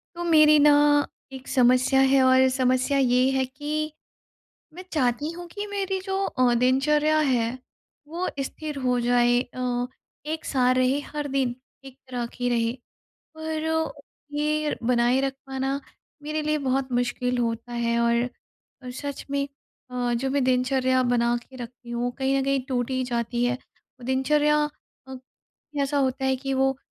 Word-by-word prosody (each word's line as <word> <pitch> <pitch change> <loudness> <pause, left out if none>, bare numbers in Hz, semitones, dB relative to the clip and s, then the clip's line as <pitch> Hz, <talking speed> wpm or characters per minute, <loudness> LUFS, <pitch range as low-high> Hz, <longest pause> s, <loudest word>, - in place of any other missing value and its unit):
तो 345 - -4
मेरी 310 -2 +6
ना 295 0 +6 0.6
एक 265 0 -9
समस्या 255 +1 +3
है 270 0 +5
और 260 0 +5
समस्या 255 +1 +1
ये 255 -1 +3
है 265 -1 +1
कि, 300 +3 -4 0.8
मैं 365 +2 -9
चाहती 270 0 0
हूँ 350 +1 -8
कि 410 +4 -6
मेरी 395 -2 -2
जो 385 -1 -2
अ, 250 -2 +2
दिनचर्या 295 +5 +3
है, 255 -4 +1 0.5
वो 345 +4 -3
स्थिर 300 +2 -6
हो 250 -1 +2
जाए 245 0 +3
अ, 245 -1 -3 0.4
एक-सा 280 -5 0
रहे, 255 +2 +2
हर 295 0 -5
दिन 265 -3 0 0.3
एक 265 -1 -12
तरह 245 -2 -3
की 245 0 -1
रहे। 230 -1 +1 0.6
पर 320 0 -2 0.4
ये 300 0 0
बनाए 240 +2 +2
रख 270 0 0
पाना 270 +1 -2 0.4
मेरे 305 +1 -2
लिए 305 0 0
बहुत 260 0 0
मुश्किल 245 0 0
होता 230 0 -2
है 235 0 0
और 235 0 +2 0.6
और 250 - -6
सच 280 +2 -6
में 280 0 0 0.5
अ, 245 -1 -1
जो 265 +3 -1
मैं 280 0 +1
दिनचर्या 255 0 +2
बना 240 -1 +2
के 260 +2 -11
रखती 240 0 -10
हूँ, 240 +1 -1
कहीं 270 +1 +1
न - - -1
कहीं 275 0 +1
टूट 245 -1 -1
ही 260 0 0
जाती 240 0 -1
है। 245 +1 0 0.5
दिनचर्या 295 +3 +2 0.5
अ, 265 - -7 0.7
ऐसा 280 +1 0
होता 265 0 0
है 265 0 +2
कि 270 +1 -3
वो 270 0 +2
260 Hz, 155 wpm, -25 LUFS, 245-295 Hz, 0.8 s, मेरी